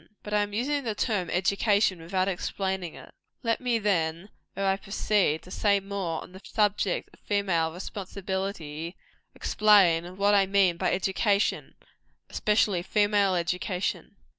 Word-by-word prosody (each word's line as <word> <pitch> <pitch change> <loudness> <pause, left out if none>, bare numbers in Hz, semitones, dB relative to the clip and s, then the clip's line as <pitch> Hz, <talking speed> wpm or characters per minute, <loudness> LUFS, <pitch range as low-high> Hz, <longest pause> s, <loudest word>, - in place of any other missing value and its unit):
But 210 - -6
I 210 - +4
am 205 0 -2
using 275 +7 -1
the 225 -3 -2
term 205 -6 -1
education 200 +1 +2
without 185 +3 -1
explaining 190 -1 -3
it. - - -13 0.3
Let 230 +1 0
me, 245 -2 +1
then, 175 -3 -1 0.3
ere 195 - -1
I 195 0 +3
proceed 200 -5 0
to 185 - -13
say 200 0 +2
more 195 -4 -4
on - - -14
the 190 +1 -12
subject 205 -3 0
of - - -20
female 185 -6 0
responsibility, 190 -3 -5 0.4
explain 185 -4 +3
what 200 +1 +3
I 195 -1 +4
mean 190 -3 +3
by - - 0
education, 200 +2 0 0.6
especially 210 -4 +2
female 205 0 +2
education. 180 +2 -2
195 Hz, 140 wpm, -27 LUFS, 180-205 Hz, 0.6 s, I